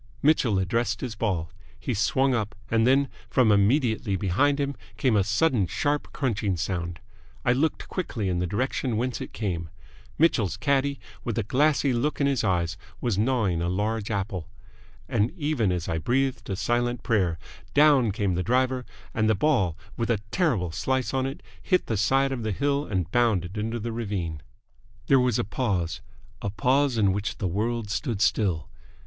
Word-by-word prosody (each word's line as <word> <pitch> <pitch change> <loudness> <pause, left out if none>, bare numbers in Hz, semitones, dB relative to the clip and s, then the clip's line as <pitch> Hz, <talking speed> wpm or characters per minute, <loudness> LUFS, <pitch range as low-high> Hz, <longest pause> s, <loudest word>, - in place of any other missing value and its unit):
Mitchell 135 -8 +3
addressed 110 +4 0
his 125 -4 -3
ball. 95 -7 -2 0.3
He - - -2
swung 130 +5 +2
up, 110 -3 -2 0.2
and 115 +1 +3
then, 135 +2 +4 0.2
from 125 -5 +4
immediately 110 0 +2
behind 120 +11 +2
him 140 0 0 0.2
came 115 +1 +2
a 100 - +4
sudden 105 - +2
sharp 145 +8 -1
crunching 105 -8 -1
sound. 85 -1 -3 0.5
I 125 - +4
looked 155 +5 0
quickly 120 - -3
in 90 -1 0
the 90 - 0
direction 125 +3 -1
whence 125 +2 -2
it - - -6
came. 85 -7 -3 0.5
Mitchell's 130 - +2
caddie, 140 -1 +1 0.2
with 115 -3 -3
a 115 - +1
glassy 140 +3 +2
look 135 +6 0
in 140 - +3
his 140 -3 +1
eyes, 90 -1 0 0.2
was 115 -6 0
gnawing 110 -8 +1
a 85 - 0
large 105 +3 -1
apple. 95 -5 -3 0.6
And 105 +3 +1
even 145 - +1
as 90 -2 -2
I 80 - -1
breathed 125 +3 0
a 95 - -1
silent 120 +3 0
prayer, 95 -8 +1 0.4
down 140 -6 +5
came 100 -2 0
the 90 - 0
driver, 130 +3 +1 0.3
and 110 0 +2
the 110 - +4
ball, 95 - +2 0.2
with 115 0 -1
a 115 - +3
terrible 115 - +1
slice 130 +9 -1
on 130 0 +1
it, 135 - -7 0.2
hit 185 -2 +1
the 110 - -1
side 135 +6 +2
of 130 -3 -3
the 110 -1 -2
hill 140 +6 0
and 90 -3 -2
bounded 105 -7 +1
into 110 +2 -2
the 115 +2 -4
ravine. 100 -9 -3 0.6
There 135 - +5
was 125 -3 +2
a - - +1
pause 95 -6 -1 0.4
a 100 - -2
pause 125 +6 +2
in 100 -3 +3
which 100 +2 -3
the 100 - -1
world 110 +4 -1
stood 115 -3 -2
still. 95 - +1
115 Hz, 180 wpm, -26 LUFS, 95-130 Hz, 0.6 s, down